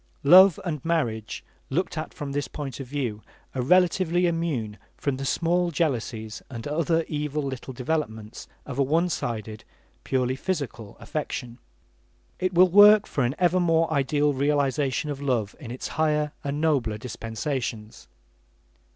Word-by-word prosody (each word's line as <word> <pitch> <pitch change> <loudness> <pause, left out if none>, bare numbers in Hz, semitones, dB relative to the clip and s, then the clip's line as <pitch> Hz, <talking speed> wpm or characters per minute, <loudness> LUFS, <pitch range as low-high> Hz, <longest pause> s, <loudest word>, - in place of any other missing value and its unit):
Love 185 -1 +8
and 150 -6 -3
marriage 120 -11 -2 0.3
looked - - -1
at - - -4
from 145 -1 -6
this 145 +1 -2
point 140 -4 -6
of 135 - -6
view, 120 -6 -3 0.3
are 130 - -2
relatively 180 +3 +3
immune 155 -11 -2 0.2
from 140 -3 -2
the 135 - -4
small 175 +4 +1
jealousies 120 -8 -2
and 120 -2 -6
other 165 +2 +1
evil 150 0 -2
little 130 -1 -5
developments 120 -5 -4 0.2
of 140 -1 -6
a - - +5
one 165 +6 +2
sided, 110 -7 -4 0.4
purely 130 -1 0
physical 135 - -4
affection. 125 -5 -5 0.8
It 185 0 0
will 180 +1 +5
work 205 +3 +8
for 140 - -1
an 120 +3 0
ever 180 0 +3
more 165 -2 +2
ideal 145 +1 +2
realization 140 0 0
of 140 -1 -6
love 120 -7 -1
in 130 -7 -9
its 125 +2 -5
higher 150 -1 0
and 140 +1 -2
nobler 135 -9 +1
dispensations. 115 -1 -5
145 Hz, 145 wpm, -25 LUFS, 125-165 Hz, 0.8 s, Love